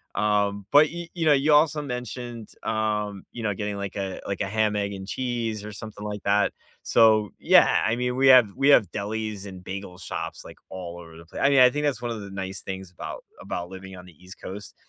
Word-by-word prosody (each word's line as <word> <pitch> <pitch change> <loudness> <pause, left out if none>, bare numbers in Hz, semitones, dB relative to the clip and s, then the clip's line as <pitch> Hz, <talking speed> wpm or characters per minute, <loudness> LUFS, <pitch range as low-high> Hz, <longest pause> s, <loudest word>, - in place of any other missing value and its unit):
um, 100 -1 +1
but, 150 +1 +7
you 170 0 -7
you 170 -2 -2
know, 155 - +6
you 145 +2 +3
also 150 0 +4
mentioned, 125 -3 -6
um, 105 -2 -1
you 120 - -7
know, 105 -1 0
getting, 105 +1 -4
like, 100 -1 -5
a 95 -2 -4
like, 100 - -3
a 100 - 0
ham, 105 +1 +1
egg, 100 -1 -1
and 95 -1 -7
cheese 115 -3 -3
or 105 - -7
something 105 0 -9
like 105 -1 -5
that, 100 0 +2 0.3
so, 110 -2 +4
yeah, - - +5
I 110 - +1
mean, 125 +1 -2
we 135 +1 +4
have 125 -5 +8
we 135 - +2
have 105 -10 +5
delis 105 0 -4
and 95 -2 -9
bagel 95 -1 -7
shops, - - -6
like, - - -12
all 90 -2 -7
over 80 -1 -12
the 85 +1 -13
pla - - -9
I 140 - +4
mean, 140 -1 +5
I 125 - +8
think 150 +4 -2
that's 135 -5 -1
one 120 -1 -3
of 115 - -4
the 100 -1 -9
nice 95 0 -5
things 95 -2 -6
about 90 - -7 0.2
about 90 0 -5
living 95 0 -9
on 90 0 -11
the 90 - -15
East 90 +1 -13
Coast, 100 +2 -8
105 Hz, 235 wpm, -25 LUFS, 95-120 Hz, 0.3 s, have